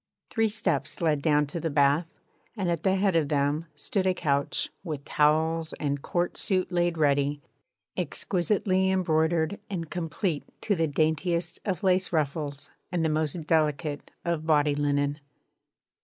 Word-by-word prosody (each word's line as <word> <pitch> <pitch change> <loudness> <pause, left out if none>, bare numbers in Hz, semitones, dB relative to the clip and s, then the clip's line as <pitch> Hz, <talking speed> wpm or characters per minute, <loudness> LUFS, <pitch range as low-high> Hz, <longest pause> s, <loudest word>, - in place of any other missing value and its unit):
Three 225 -1 +2
steps 220 +2 -1
led 155 -4 +1
down 150 -1 +3
to 145 +4 -5
the 165 - -1
bath, 145 +3 +3 0.5
and 185 -4 0
at 170 -2 -1
the 190 +1 +2
head 195 -2 +2
of 155 -3 +2
them 145 +3 0
stood 190 - -1
a 185 - +2
couch, 140 -4 0
with 150 -6 -5
towels, 160 +2 +2
and 145 -1 -2
court 175 +3 -1
suit 185 -2 0
laid 175 -1 +1
ready, 145 -1 +2 0.6
exquisitely 190 0 +1
embroidered 170 0 +1
and 170 -5 -4
complete 170 -1 -2 0.2
to 205 - +1
the 165 -2 +1
daintiest 165 +3 0
of 195 0 -2
lace 185 0 +3
ruffles 145 -2 -1 0.2
and 170 -2 0
the - - +2
most 155 +1 0
delicate 150 -2 0 0.2
of 165 -2 -1
body 150 -2 +4
linen. 145 0 0
160 Hz, 150 wpm, -27 LUFS, 150-180 Hz, 0.6 s, body